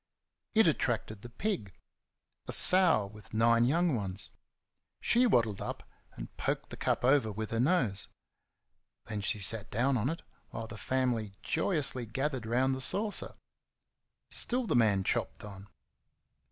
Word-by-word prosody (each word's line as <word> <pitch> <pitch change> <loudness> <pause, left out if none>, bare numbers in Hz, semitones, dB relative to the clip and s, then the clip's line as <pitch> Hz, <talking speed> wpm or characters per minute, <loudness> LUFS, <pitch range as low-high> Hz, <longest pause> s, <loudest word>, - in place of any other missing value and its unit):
It 220 - +5
attracted 115 -9 -1
the 120 - -10
pig 120 - -4 0.7
a - - -4
sow 180 - +6
with 105 +1 -12
nine 115 +1 +4
young 165 +3 +2
ones. 95 -3 -3 0.7
She 245 +1 +3
waddled 115 - +1
up, - - -6 0.3
and - - -9
poked - - -3
the - - -6
cup - - -1
over 130 -4 +3
with 110 +1 -5
her 115 - -1
nose; 125 - +1 1.0
then 105 -2 -4
she 105 +2 -2
sat 105 +2 -3
down 130 +4 +1
on 120 +4 0
it, 165 - -5 0.3
while 115 - -6
the 110 - -9
family 120 -4 -2
joyously 145 - -2
gathered 130 +1 -3
round 130 +3 +1
the 130 - -4
saucer. 205 +10 +2 1.0
Still 250 +1 0
the - - -1
man 105 -5 +3
chopped - - -2
on. 100 -1 -10
120 Hz, 145 wpm, -30 LUFS, 105-145 Hz, 1.0 s, sow